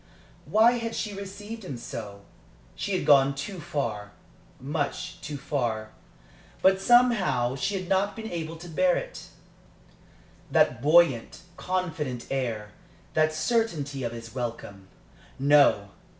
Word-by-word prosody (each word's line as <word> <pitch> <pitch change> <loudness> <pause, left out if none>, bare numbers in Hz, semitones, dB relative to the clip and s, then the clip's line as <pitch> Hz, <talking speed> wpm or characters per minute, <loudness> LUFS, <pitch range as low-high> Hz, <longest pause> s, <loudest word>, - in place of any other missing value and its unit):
Why 235 +3 +4
had 230 0 -4
she 210 -2 -3
received 200 +3 -8
him 140 -9 -6
so? 100 -4 -8 0.5
She 200 - -3
had - - -3
gone 140 -1 +5
too 180 +7 -5
far 110 -10 -4 0.5
much 145 +2 -3
too 145 -1 -5
far. 120 -6 -2 0.7
But, 190 0 +5
somehow, 200 - +3
she 195 +8 -1
had 185 -2 -4
not 195 +2 +1
been 220 0 -6
able 165 -1 -4
to 170 +2 -10
bear 180 +2 +2
it - - -7 1.2
that 120 -1 +3
buoyant, 150 -5 +3
confident 160 -9 -3
air, 115 -6 -2 0.4
that 155 0 +3
certainty 155 - -1
of 120 - -2
his 115 -1 -9
welcome. 115 -6 -6 0.5
No! 140 -8 +4
150 Hz, 125 wpm, -27 LUFS, 125-190 Hz, 1.2 s, gone